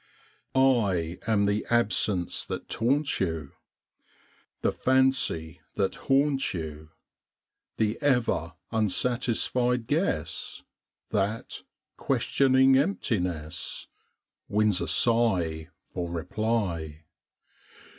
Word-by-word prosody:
I 100 -11 +2
am 105 -2 +3
the 100 +1 0
absence 105 -5 +1
that - - -5
taunts 140 +5 +1
you, 80 -6 -2 1.1
The - - +2
fancy 130 -11 +1
that 95 -1 0
haunts 135 -3 +1
you; 80 -2 -6 0.9
The 110 0 0
ever 125 - +1 0.2
unsatisfied 120 +2 +1
guess 145 - -2 0.5
That, 105 +3 -2 0.4
questioning 130 +1 +3
emptiness, 90 - -2 0.6
Wins 105 -2 +2
a - - -2
sigh 90 -10 +2 0.2
for 90 -2 -3
reply. 85 -3 -2
110 Hz, 80 wpm, -27 LUFS, 85-125 Hz, 1.1 s, am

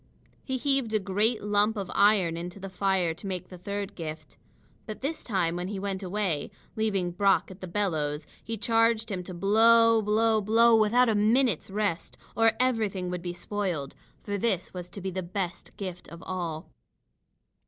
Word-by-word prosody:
He 265 -1 -2
heaved 270 -4 0
a - - +3
great 210 +4 0
lump 210 +1 +2
of 195 -3 -4
iron 200 -5 +4
into 175 +3 -6
the 195 0 -7
fire 185 -3 +1
to 170 +5 -9
make 185 -3 -5
the 180 - -10
third 200 +2 -4
gift. 160 -3 -7 0.5
But 215 -2 -7
this 290 +4 -3
time 180 -6 0
when 180 +1 -3
he 200 +1 -4
went 195 0 -3
away, 185 -5 -2 0.3
leaving 200 -5 0
Brock 195 +1 +2
at 190 - -13
the 185 - -5
bellows, 160 -6 -1 0.2
he 225 0 -4
charged 225 0 +2
him 185 -2 -2
to 180 0 -8
blow 225 +4 +5
blow 215 +1 +2
blow 225 +3 +5
without 225 +3 +4
a 225 - +3
minute's 215 - +2
rest, 200 -3 -2 0.2
or 225 0 +4
everything 215 -8 0
would 180 -1 -3
be 175 0 -4
spoiled. 180 -8 -3 0.3
For 205 -1 -3
this 195 -4 -1
was 180 -1 -7
to 200 - -8
be 190 +1 -3
the 185 +1 -3
best 180 0 -5
gift 185 -3 -6
of 170 0 -11
all. 170 -4 -4
200 Hz, 180 wpm, -28 LUFS, 180-220 Hz, 0.5 s, blow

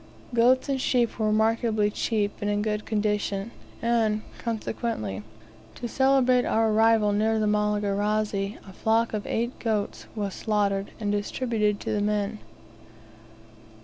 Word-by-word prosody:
Goats 245 +3 +4
and 270 -2 -1
sheep 240 -3 +1
were 215 - +1
remarkably 220 0 +2
cheap, 205 -2 -1
and 205 - 0
in 205 0 0
good 210 -1 -2
condition; 210 -1 -1 0.3
and, 225 -2 +1 0.2
consequently, 220 - -3 0.5
to 240 - -5
celebrate 260 -1 +3
our 225 -1 +2
arrival 220 -1 +4
near 220 +2 +2
the 215 - +1
Malagarazi, 210 0 0
a 190 - -11
flock 225 +3 +1
of 210 -1 -3
eight 235 +2 -2
goats 215 -3 -2
was 200 -3 -3
slaughtered, 200 -2 0
and 205 -2 -1
distributed 210 0 0
to - - -3
the 210 - 0
men. 210 +1 -1
215 Hz, 135 wpm, -26 LUFS, 205-230 Hz, 0.5 s, Goats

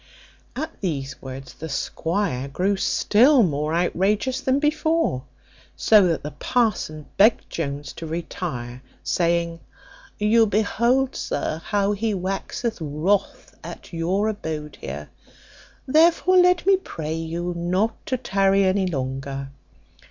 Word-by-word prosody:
At 315 +5 -5
these 140 -8 -3
words 130 -1 -8
the 160 - -8
squire 150 -1 -2
grew 185 +8 0
still 240 +7 +4
more 150 -2 0
outrageous 205 +9 +1
than 265 0 +2
before; 305 - +1 0.5
so 210 -4 +5
that 165 -3 -1
the 150 - -5
parson 155 - -1
begged 215 +3 +4
Jones 145 -3 -4
to 165 - -7
retire; 145 -7 -5 0.2
saying, 170 -1 0 0.6
"You 220 +2 +4
behold, 235 +6 +1
sir, 160 - -3
how 205 -1 +1
he 210 +1 -1
waxeth 195 +5 -3
wrath 160 +7 -1
at - - -10
your 180 +6 0
abode 155 -8 -5
here; 75 +2 -6 0.8
therefore 335 +5 +4
let 360 -1 +4
me 390 0 +5
pray 160 - -5
you 165 +2 -3
not 185 +6 -1
to 255 - 0
tarry 195 -4 +2
any 190 0 +2
longer. 135 -2 -4
185 Hz, 120 wpm, -23 LUFS, 155-225 Hz, 0.8 s, so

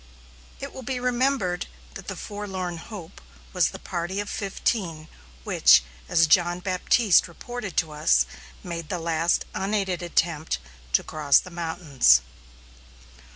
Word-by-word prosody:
It - - -7
will 260 - -8
be 255 0 -3
remembered 245 -7 0 0.3
that - - -10
the - - -4
Forlorn 190 -4 -5
Hope 185 -1 -10 0.3
was 180 -3 +3
the 190 - -8
party 185 +1 -4
of 205 - -4
fifteen 190 -5 -2 0.4
which, 65 - +6 0.3
as 165 - +5
John 175 +2 +3
Baptiste 185 +2 +3
reported 215 +3 -7
to 160 -3 +1
us, 60 - +3 0.4
made 170 -3 -6
the 180 - -1
last 165 0 +1
unaided 195 -2 -1
attempt 165 -2 0 0.4
to - - +4
cross 150 -3 +3
the 185 - -2
mountains. 160 - +3
175 Hz, 130 wpm, -25 LUFS, 165-200 Hz, 0.4 s, which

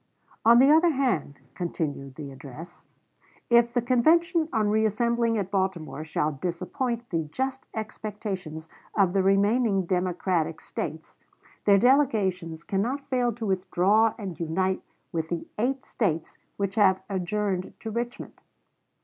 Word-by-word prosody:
"On 235 +1 +7
the 270 +4 +7
other 325 +3 +6
hand," 245 - 0
continued 145 -6 -4
the 145 -2 -7
address, 145 +6 -11 0.6
"if 235 0 +5
the 245 -1 0
convention, 320 +7 +3
on 220 -3 +1
reassembling 225 +2 +1
at 195 -2 -3
Baltimore, 190 -6 -2
shall 155 -1 -1
disappoint 185 - -3
the 165 -2 0
just 265 +3 -3
expectations 205 -7 -5 0.3
of 190 -4 +3
the 195 - +3
remaining 200 +1 +3
Democratic 180 -2 0
States, - - -6 0.5
their 200 -1 +6
delegations 195 - +2
cannot 230 +9 -1
fail 245 -2 +2
to 225 +1 -5
withdraw 195 +3 +2
and 195 -7 -6
unite 185 +3 0 0.3
with 160 -2 -2
the 170 -1 -3
eight 260 +3 0
States 165 -8 -2 0.2
which 200 -1 -1
have 190 -3 +3
adjourned 190 0 -2
to 220 - -5
Richmond." 240 +3 -5
200 Hz, 130 wpm, -26 LUFS, 175-235 Hz, 0.6 s, On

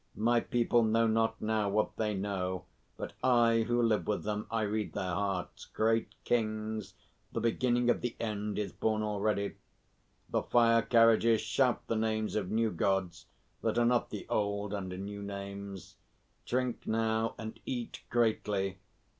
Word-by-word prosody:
My 120 +2 +3
people 120 0 +2
know 115 +1 +3
not 115 0 +1
now 110 -1 0
what 105 +2 0
they 105 -2 -1
know; 95 -2 -2 0.3
but - - -6
I, 115 -3 +4
who 120 0 +2
live 110 -2 +2
with 105 - -1
them, 105 0 -3
I 115 -1 0
read 105 0 -2
their 95 -3 -2
hearts. 95 -1 -2
Great 115 +1 +1
Kings, 110 -2 -1 0.4
the - - -2
beginning 120 +1 +1
of 120 - +3
the 120 -1 -3
end 105 -2 -2
is 105 -1 -2
born 110 -1 0
already. 105 -1 -1 0.7
The - - 0
fire 115 -1 +4
carriages 115 -1 +5
shout 120 +3 +1
the 115 - -1
names 110 -1 0
of 100 -4 -1
new 110 +1 +1
Gods 95 0 -1 0.3
that - - 0
are 120 - +4
not 120 0 +2
the 105 - -6
old 100 0 -1
under 95 -2 -4
new 100 +1 -6
names. 100 -1 -7 0.5
Drink 125 -1 -1
now 110 0 0
and 110 -1 -7
eat 120 -2 -4
greatly! 105 -5 0
110 Hz, 155 wpm, -31 LUFS, 100-115 Hz, 0.7 s, carriages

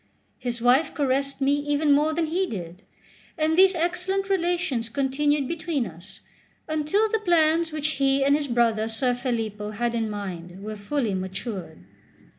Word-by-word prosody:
His 240 -2 -3
wife 255 +6 +3
caressed 275 -1 0
me 275 +1 +3
even 290 +1 +1
more 295 +2 +4
than 325 +1 0
he 360 +4 0
did; 180 - -7 0.6
and 315 0 +2
these 380 +1 +6
excellent 365 +3 -1
relations 340 - 0
continued 280 +3 0
between 320 -5 -2
us 185 +2 -10 0.5
until 310 +8 +1
the 445 +1 0
plans 330 -3 +3
which 305 -1 -1
he 270 0 +3
and 280 +1 +4
his 295 -1 -1
brother 230 -3 +2
Ser 235 +3 0
Filippo 225 -5 -3
had 235 +3 -2
in 225 -2 -1
mind 185 -3 -6
were 215 +1 -5
fully 215 +1 -2
matured. 190 - -5
275 Hz, 155 wpm, -25 LUFS, 220-315 Hz, 0.6 s, these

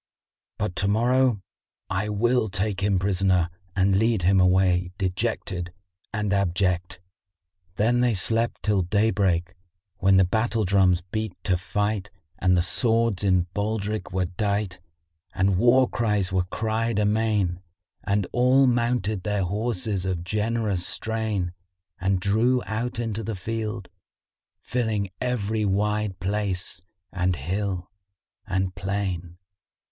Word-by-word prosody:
But 100 -4 -2
to 100 - +1
morrow 120 0 +2 0.4
I 100 +2 -2
will 115 +2 +1
take 95 +1 -1
him 100 -1 +2
prisoner 95 -2 +2 0.2
and 95 0 +3
lead 110 -4 +2
him 95 +2 +4
away 90 -1 +3
dejected 95 -2 -2 0.4
and 105 -3 -1
abject." 90 -2 0 0.8
Then 120 +5 +2
they 120 -3 +2
slept 115 +5 0
till 105 -3 +2
daybreak, 95 -2 +1 0.5
when 95 0 +4
the 95 - +6
battle 110 +3 0
drums 95 -2 +3
beat 110 0 -2
to 95 - +2
fight 105 +2 -2 0.3
and 90 -1 +3
the 85 - +3
swords 115 +1 +1
in 90 -3 +3
baldric 105 0 -2
were 95 0 0
dight; 100 0 -2 0.6
and 95 -1 +2
war 125 +3 +5
cries 105 -6 0
were 90 -1 +2
cried 110 +3 -1
amain 105 -4 +1 0.4
and 100 -1 +1
all 130 +2 +4
mounted 120 -5 +1
their 105 0 -1
horses 105 0 -1
of 90 -3 -2
generous 105 0 -1
strain 110 -5 -1 0.5
and 95 +1 +1
drew 115 +6 +2
out 115 +3 -3
into 115 -2 -2
the 110 +1 -3
field, 110 0 -4 0.7
filling 110 -6 -1
every 110 -4 -1
wide 105 0 0
place 95 -2 -2 0.3
and 90 -1 +1
hill 90 +4 -3 0.6
and 95 0 -1
plain. 90 -2 -3
100 Hz, 125 wpm, -25 LUFS, 95-110 Hz, 0.8 s, the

